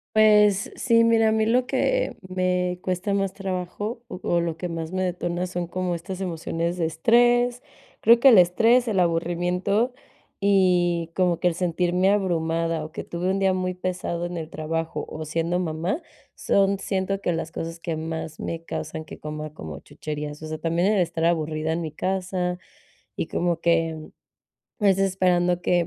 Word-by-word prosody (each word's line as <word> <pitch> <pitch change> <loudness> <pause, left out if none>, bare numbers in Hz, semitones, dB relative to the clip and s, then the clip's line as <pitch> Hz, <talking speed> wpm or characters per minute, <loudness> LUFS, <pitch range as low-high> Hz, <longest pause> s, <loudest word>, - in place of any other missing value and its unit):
Pues 210 -2 +5
sí, 230 -2 +4
mira, 225 -1 +4
a 220 - +3
mí 220 0 +2
lo 245 +3 +2
que - - 0
me 180 -1 0
cuesta 185 +2 -2
más 195 -1 0
trabajo 195 +4 -4
o 185 -6 -8
o 175 - +2
lo 170 -1 -1
que 175 +2 -5
más 165 0 -5
me 185 0 0
detona 175 -1 -2
son 175 -1 -4
como 180 +1 -2
estas 185 +3 -6
emociones 170 -1 -2
de 170 - 0
estrés. 240 +8 +3 0.4
Creo 235 +2 +6
que 270 - +8
el 230 - +8
estrés, 225 +8 +5
el 200 -5 +2
aburrimiento 180 +7 0 0.5
y 180 -4 +2
como 180 -3 +2
que 180 - +4
el - - -3
sentirme 180 +2 +1
abrumada 165 -4 0
o 155 - -11
que - - -5
tuve 175 +2 -3
un 195 +1 +1
día 195 -1 +3
muy 185 0 -1
pesado 180 -1 -3
en 175 0 -5
el 160 -1 -5
trabajo 160 +1 -3
o 155 0 -6
siendo 165 +3 -1
mamá 170 - -2 0.3
son, 195 0 +2
siento, 195 0 -1
que 175 - -1
las 165 -1 -4
cosas 165 0 -6
que 165 -2 -3
más 160 0 -5
me 165 0 -4
causan 160 -1 -5
que 155 - -11
coma 155 0 -6
como 80 - -8
chucherías. 150 0 -6
O 155 - -6
sea, 155 0 -4
también 170 +5 +1
el 200 - +3
estar 165 -1 -1
aburrida 160 -1 0
en 170 - -2
mi 160 - -4
casa 180 +1 -2 0.6
y - - -2
como 170 -1 -1
que 165 -1 +2 0.8
es 195 -2 +4
esperando 180 -2 +2
que, 175 -1 +2
180 Hz, 180 wpm, -24 LUFS, 165-195 Hz, 0.8 s, que